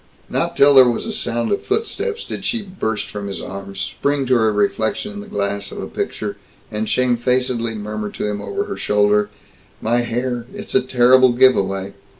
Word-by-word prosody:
Not - - -1
till 140 +1 +7
there 130 -2 +8
was 120 - -2
a 225 - -3
sound 120 - -1
of - - +1
footsteps 445 +1 -2
did - - -6
she 235 -3 -1
burst 110 - -3
from 100 -1 -5
his 100 - -4
arms, 100 0 -7
spring 140 +6 -1
to 130 - +2
her 110 -3 +3
reflection 110 - 0
in 205 - -7
the 205 - -9
glass 100 - -2
of - - -8
a - - -4
picture, - - -4 0.3
and 105 +1 -2
shamefacedly 125 -1 +1
murmur 105 0 -4
to - - -3
him 105 -1 -2
over 100 -1 -2
her - - -6
shoulder, 105 0 +2 0.5
"My 115 +2 +1
hair 120 0 -2
it's 205 +1 -7
a - - +5
terrible 130 0 +5
giveaway!" 100 -6 +3
120 Hz, 185 wpm, -20 LUFS, 105-130 Hz, 0.5 s, there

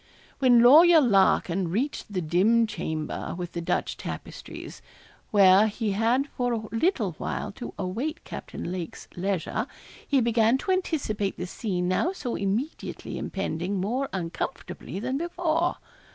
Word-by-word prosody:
When 245 -3 +6
Lawyer 320 +7 +8
Larkin 195 - +3
reached 235 - -2
the 185 -3 -2
dim 200 +9 +3
chamber, 160 -9 -4
with 175 -1 -5
the 170 - -4
Dutch 165 - -1
tapestries, - - -8 0.5
where 200 0 +6
he 215 0 -2
had 230 +7 +2
for 245 -1 -1
a 220 -1 -3
little 225 - +1
while - - -3
to 240 +4 -8
await 235 - -3
Captain 170 - -6
Lake's 180 -3 -6
leisure, 195 - -2 0.4
he 280 - +3
began 230 0 +3
to 380 - -2
anticipate 265 - -1
the 180 - -3
scene 180 -1 -2
now 250 - +1
so 255 -10 -4
immediately 210 +10 -3
impending 190 0 -3
more 245 +8 -1
uncomfortably 175 -2 -5
than 260 +6 -2
before. 340 0 0
220 Hz, 135 wpm, -26 LUFS, 185-265 Hz, 0.5 s, Lawyer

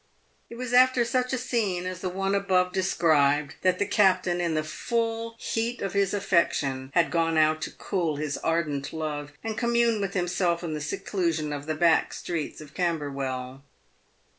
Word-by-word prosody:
It 235 - -9
was 250 0 -5
after 255 -1 +5
such 250 +1 0
a 260 - 0
scene 215 -8 -1
as 185 -1 -4
the 185 - -2
one 195 +2 -1
above 185 -2 +2
described 150 -6 +2
that 185 -1 +2
the 205 - +1
cap 190 -3 +3
tain, 175 -1 -1
in 170 -2 0
the 155 - 0
full 230 +6 -2
heat 230 +1 -2
of 195 - -3
his 200 -1 +2
affection, 145 -9 0
had 170 -2 +3
gone 165 -1 +1
out 155 0 +3
to - - -4
cool 170 -6 -2
his 145 0 -3
ardent 155 -4 -1
love 150 -2 -4
and 225 -1 -3
commune 235 -2 +2
with 195 0 -3
himself 175 -1 0
in 165 -2 -3
the 150 - -4
seclusion 160 -1 -2
of 145 +1 -6
the 155 - -1
back 165 0 +3
streets 160 -3 -4
of 150 -1 -12
Camberwell. 135 -6 -3
175 Hz, 180 wpm, -26 LUFS, 155-200 Hz, -, after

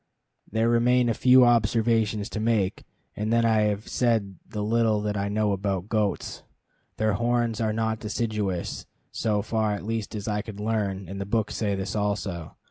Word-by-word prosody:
There 110 +2 +1
remain 120 +1 +3
a - - +2
few 125 +3 +6
observations 115 -2 +2
to 110 - -3
make, 110 -4 0 0.3
and 105 +1 -2
then 115 0 +3
I 110 -1 +3
have 105 0 -2
said 110 -6 0
the 105 -1 -3
little 110 0 +2
that 105 0 -2
I 100 0 -1
know 105 0 +1
about 100 0 -2
goats. 105 -3 -1 0.6
Their 110 -1 +1
horns 120 +1 0
are 110 -1 +1
not 110 0 -1
deciduous, 105 -4 -3 0.2
so 105 -2 0
far 110 -1 0
at 100 - -5
least 110 -1 -3
as 105 0 -5
I 105 -1 0
could 105 -1 -9
learn, 105 -3 -2
and 100 +2 -6
the 100 - -4
books 110 0 0
say 100 -3 0
this 95 0 -4
also. 100 -5 -2
110 Hz, 180 wpm, -26 LUFS, 100-115 Hz, 0.6 s, few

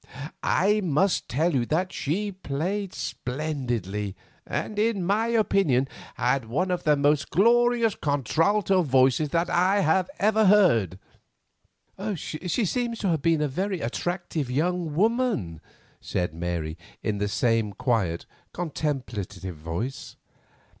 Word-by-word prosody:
I 210 +3 +2
must 180 +3 +1
tell 160 +6 +1
you 130 -3 +2
that 180 +4 0
she 200 +8 -2
played 185 +3 -3
splendidly, 120 - -3 0.3
and, 210 - -3
in 210 -4 +1
my 210 +5 +1
opinion, 195 - +2 0.3
had 125 0 +1
one 165 +12 -1
of 180 -1 -2
the 150 -1 +5
most 145 +1 +2
glorious 235 +3 +3
contralto 165 - +1
voices 135 0 +3
that 170 +3 +1
I 185 +3 +2 0.3
ever 215 +1 +3
heard." 150 - +4 1.2
"She 180 - -2
seems 235 +4 -1
to 200 - -1
have 160 -4 +1
been 160 0 +2
a - - +1
very 185 +6 -2
attractive 165 +2 -3
young 165 +3 -1
woman," 210 - 0 0.4
said 90 -3 -2
Mary, 85 -1 -3 0.2
in 105 -2 -1
the 105 - 0
same 115 0 +1
quiet, 100 -6 -1 0.3
contemplative 120 - -4
voice. 85 - -5
155 Hz, 120 wpm, -26 LUFS, 120-195 Hz, 1.2 s, the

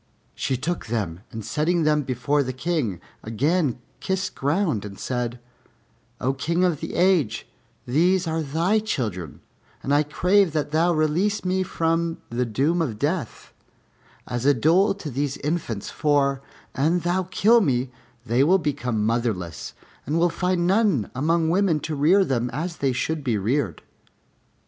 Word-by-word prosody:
She 130 - -2
took 165 +4 -3
them, 100 -8 -2
and 110 -2 -7
setting 160 +8 +1
them 150 -1 +3
before 135 +2 0
the 130 -2 -3
King, 130 - -2 0.2
again 140 +5 0 0.2
kissed 190 0 -2
ground 145 - 0
and 100 -2 -8
said, 125 -1 -3 0.8
"O 130 +2 0
King 170 +6 0
of 175 -5 +1
the - - -5
Age, 180 - +2 0.4
these 175 +8 +2
are 160 0 -1
thy 165 +9 +1
children 105 - -4 0.4
and 140 - 0
I 145 - +5
crave 180 +4 +2
that 150 -2 -1
thou 165 +3 +3
release 170 +6 +1
me 185 +1 +1
from 165 -2 0
the 120 +1 -1
doom 145 +10 +1
of 125 -10 -2
death, 145 - -3 0.7
as 120 -1 -3
a 140 +1 +4
dole 180 - +3
to 160 -7 -7
these 140 +2 -2
infants; 145 -9 -3
for, 140 -2 +1 0.3
an 160 +6 +1
thou 180 +1 0
kill 230 +5 +4
me, 130 - 0 0.3
they 120 +4 +3
will 180 +6 +5
become 130 - -1
motherless 110 -7 -2 0.3
and 150 +4 0
will 175 +1 +3
find 180 0 0
none 190 - +2
among 160 +5 +1
women 185 -4 +2
to 160 - -4
rear 170 +7 +4
them 125 -4 -1
as 160 +7 -4
they 135 -2 +1
should 155 +4 -2
be 120 -5 0
reared." 120 +7 -1
150 Hz, 155 wpm, -24 LUFS, 125-175 Hz, 0.8 s, I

